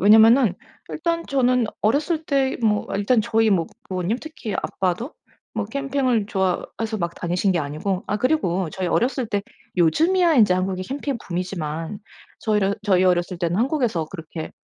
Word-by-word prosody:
왜냐하면은 220 +2 +6 0.4
일단 335 +1 -1
저는 250 -3 +2 0.2
어렸을 305 +8 +1
때 270 -2 +1
뭐 210 -2 +2
일단 210 +3 +2
저희 225 +1 +2
뭐 170 -5 +2 0.2
부모님 185 +5 -1
특히 310 -9 -6
아빠도 190 - -2 0.4
뭐 220 -2 -1
캠핑을 260 -3 0
좋아해서 215 +2 -2
막 170 -1 -2
다니신 180 +3 0
게 175 - +1
아니고 160 +6 -2
아 210 - 0
그리고 190 - +1
저희 185 +1 -3
어렸을 250 +7 +1
때 205 -2 -1 0.4
요즘이야 335 - +4
인제 210 -8 +5
한국이 185 0 -1
캠핑 275 +4 -3
붐이지만 170 0 -4 0.4
저희를 205 -2 +1
저희 190 -3 +3
어렸을 180 -1 +1
때는 170 +1 0
한국에서 240 - +1
그렇게 165 -2 -7
210 Hz, 350 characters per minute, -23 LUFS, 180-255 Hz, 0.4 s, 왜냐하면은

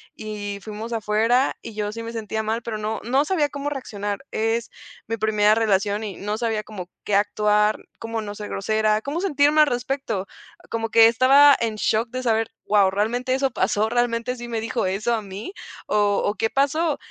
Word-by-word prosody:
y 210 -2 -5
fuimos 215 +3 -7
afuera, 225 +4 +2
y 230 - -9
yo 210 -1 -2
sí 230 +2 -6
me 230 0 -6
sentía 220 -1 -3
mal, 225 +2 -2
pero 225 -2 -4
no 215 +1 -3
no 265 +5 +2
sabía 310 -4 +1
cómo 285 +1 -4
reaccionar, 205 -5 -5
es 225 +1 -1 0.4
mi 225 +1 -2
primera 215 -1 +3
relación 205 -1 +1
y 205 -4 -6
no 210 +2 -3
sabía 225 -2 -1
como 190 -5 -8 0.2
qué 210 - -2
actuar, 210 +1 +2 0.2
cómo 230 -1 -4
no 205 -1 -6
ser 210 0 -7
grosera, 215 +1 +1
cómo 295 +5 -3
sentirme 295 -4 +3
al 300 - +6
respecto. 245 -5 -2 0.5
Como 225 0 -2
que 225 0 +7
estaba 270 +4 +6
en 225 -2 -1
shock 220 +2 0
de 255 0 -4
saber: 225 -1 +1
"Guau, 200 -2 +4
¿realmente 240 +6 0
eso 270 0 0
pasó, 215 -2 +1
realmente 240 +1 0
sí 240 0 -7
me 230 -1 -2
dijo 230 0 -2
eso 205 +5 0
a 220 - -3
mí, 200 - -7 0.3
o 205 -1 +2
o, 205 - +1
qué 225 - 0
pasó?" 285 +4 +1
225 Hz, 195 wpm, -23 LUFS, 210-245 Hz, 0.5 s, que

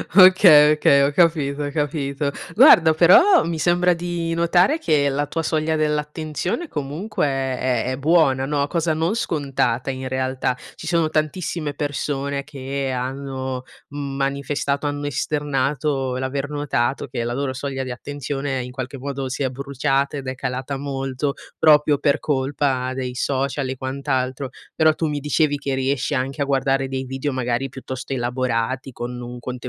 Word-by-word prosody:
Okay, 185 -6 +8
okay, 140 -2 +4
ho 140 - +2
capito, 150 -3 +2
ho 145 - -3
capito. 145 -1 -2 0.2
Guarda 160 -1 +7
però 185 - +6
mi 165 -1 -3
sembra 175 +2 +3
di 170 -1 -3
notare 175 - +3
che 150 - +2
la 145 +1 -1
tua 165 +2 -3
soglia 155 0 0
dell'attenzione 155 - -2
comunque 155 +8 -3
è 135 -2 -1
è 125 -3 0
è 130 - -3
buona 140 -3 +3
no, 145 0 0
cosa 165 0 0
non 165 +5 0
scontata 140 - -1
in 130 0 -5
realtà. 130 -1 -1 0.2
Ci 165 - -9
sono 165 -2 +2
tantissime 155 0 -2
persone 140 -1 -3
che 135 -1 -4
hanno 130 0 -4 0.3
manifestato, 140 0 -2
hanno 145 0 -3
esternato, 140 -1 -1
l'aver 130 +2 -2
notato 140 -4 -1
che 120 -2 -3
la 120 - -2
loro 135 +1 -2
soglia 135 0 -4
di 130 - -5
attenzione, 140 +1 -4
in 125 - -8
qualche 130 +1 -6
modo, 135 0 -4
si 135 +2 -3
è 130 - +1
bruciata 140 +1 -1
ed 135 - -7
è 130 - -3
calata 130 +2 -4
molto 135 0 -3 0.3
proprio 150 -1 +5
per 140 0 +1
colpa 135 -2 0
dei 125 -1 -4
social 135 +1 -1
e 130 - -3
quant'altro. 130 0 -2 0.2
Però, 155 -1 +4
tu 160 - -2
mi 145 -1 -2
dicevi 150 0 +1
che 140 -1 -3
riesci 135 +1 -1
anche 135 +2 -2
a - - +2
guardare 135 -1 +1
dei 130 0 -3
video 135 +2 -3
magari 125 +1 -1
piuttosto 130 0 -6
elaborati 125 0 -2
con 120 +1 -5
un 120 0 -7
contenuto 125 +1 -5
140 Hz, 160 wpm, -22 LUFS, 130-150 Hz, 0.3 s, Okay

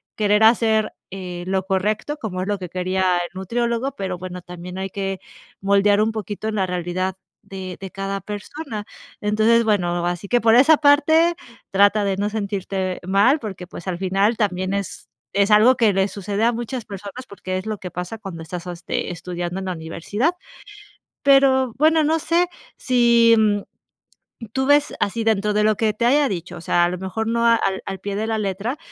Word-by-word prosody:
querer 210 0 +2
hacer, 220 -1 +3 0.2
eh, 180 -2 -6
lo 190 0 0
correcto, 210 +9 -1
como 185 -5 -4
es 190 - -3
lo 205 -1 0
que 180 -2 -7
quería 185 0 0
el 175 - -3
nutriólogo, 235 +6 -1
pero 190 -2 -4
bueno, 180 0 -7
también 180 +1 -8
hay 190 0 -3
que 195 -1 -4 0.4
moldear 200 +1 +3
un 220 +1 +2
poquito 215 0 -5
en 215 - -2
la 190 -2 +1
realidad 180 +1 -2 0.3
de 185 -2 -7
de 195 -1 -8
cada 195 0 -3
persona. 210 - -6 0.4
Entonces, 215 +3 +3
bueno, 175 -5 +1
así 175 +3 -3
que 245 +2 +2
por 225 0 +5
esa 285 +5 +6
parte 315 +4 +4 0.3
trata 200 +2 +4
de 195 -1 0
no 205 +1 -1
sentirte 195 -3 -3
mal, 200 +10 +4
porque, 190 -5 -7
pues, 175 0 -10
al 175 -1 -3
final 195 +4 +1
también 185 -3 -1
es 200 -1 -4 0.3
es 200 +1 +3
algo 225 +5 +6
que 225 -3 +3
le 195 0 +1
sucede 205 +2 -2
a 240 - +3
muchas 240 0 -5
personas, 205 +6 -8
porque 185 -1 -5
es 185 - -5
lo 215 -1 -3
que 180 -2 -8
pasa 180 +6 -5
cuando 190 -6 -8
estás, 170 +2 -7
este, 175 0 -4
estudiando 175 +1 -5
en 190 - -5
la 185 - -2
universidad. 175 - -2 0.9
Pero 265 -3 +4
bueno, 315 +2 +4
no 320 +2 +1
sé, 345 +3 +2 0.3
si, 235 -2 +4
mm, 205 -2 +2 0.9
tú 265 +1 -1
ves 290 +1 +3
así 225 +3 -1
dentro 210 -1 +1
de 210 0 +2
lo 215 -1 +2
que 215 -2 +1
te 235 +3 -1
haya 285 +3 +4
dicho, 180 -2 -5
o - - -9
sea, 175 +1 +2
a 175 - +3
lo 180 - -4
mejor 190 +5 -3
no 235 0 +1
al 225 -5 +2
al 195 -1 -5
pie 200 +1 -4
de 220 +1 -2
la 220 -1 0
letra, 205 +7 -2
205 Hz, 195 wpm, -21 LUFS, 185-230 Hz, 0.9 s, esa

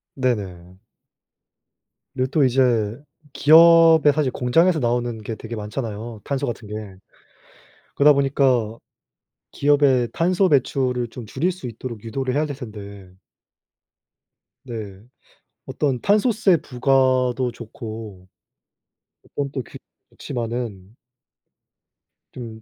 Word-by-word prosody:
네네. 95 -9 -3 1.4
네 130 - 0
또 150 -2 +3
이제 120 -4 +2 0.4
기업의 165 -1 +6
사실 145 -3 0
공장에서 165 +9 +2
나오는 120 -2 -1
게 110 +1 -5
되게 115 +1 -8
많잖아요 110 0 -6
탄소 140 0 -2
같은 115 -2 -6
게. 105 - -8 1.2
그러다 145 +1 +6
보니까 130 -5 +1 0.7
기업의 140 -4 +2
탄소 185 +3 +2
배출을 130 -3 +1
좀 120 0 -9
줄일 150 - -1
수 180 -8 -8
있도록 115 -1 -8
유도를 130 +3 -3
해야 150 +2 +1
될 145 -2 -5
텐데 100 -6 -10 1.5
네. 105 -6 -8 0.7
어떤 135 -5 -1
탄소세 205 - +3
부과도 130 -1 +1
좋고 110 -5 -9 1.0
어떤 140 -1 -5
또 135 - -3 0.5
그렇지만은 115 -5 -6 1.4
좀 115 -3 -9
125 Hz, 210 characters per minute, -22 LUFS, 110-140 Hz, 1.5 s, 기업의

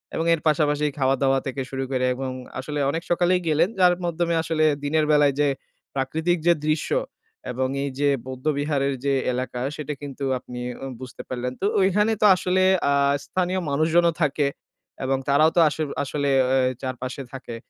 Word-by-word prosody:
এবং 165 - -1
এর 160 - -1
পাশাপাশি 150 -1 +2
খাওয়া-দাওয়া 135 0 +2
থেকে 135 0 -3
শুরু 135 0 -3
করে 130 -1 +1
এবং 130 0 -4 0.3
আসলে 145 +2 -4
অনেক 165 +4 -2
সকালেই 180 +1 +3
গেলেন 160 +5 +3
যার 180 -1 +6
মাধ্যমে 170 0 0
আসলে 160 -1 0 0.2
দিনের 155 +1 +1
বেলায় 145 -2 +4
যে 145 - +4 0.5
প্রাকৃতিক 160 +6 0
যে 170 - +7
দৃশ্য 155 0 0 0.6
এবং 130 +1 -1 0.2
এই 140 - -2
যে 145 0 +3 0.2
বৌদ্ধ 130 +2 -8
বিহারের 140 -2 0
যে 140 - +2 0.2
এলাকা 125 0 -3
সেটা 150 0 -4
কিন্তু 140 -1 -7 0.2
আপনি 125 0 -9 0.2
উ - - -3 0.2
বুঝতে 130 -1 -8
পারলেন। 125 0 -3
তো - - 0 0.2
ঐখানে 210 +3 +3
তো - - +5
আসলে 185 +1 +1 0.3
আ - - +3 0.3
স্থানীয় 185 0 -1
মানুষজনও 165 +4 +3
থাকে 145 -1 +2 0.6
এবং 135 0 +1
তারাও 155 +3 +5
তো - - +4
আস 150 - -7 0.3
আসলে 140 +1 -2 0.2
অ্যা 130 +1 +3 0.2
চারপাশে 130 +1 -5
থাকে। 125 -3 -7
145 Hz, 170 wpm, -24 LUFS, 135-165 Hz, 0.6 s, যে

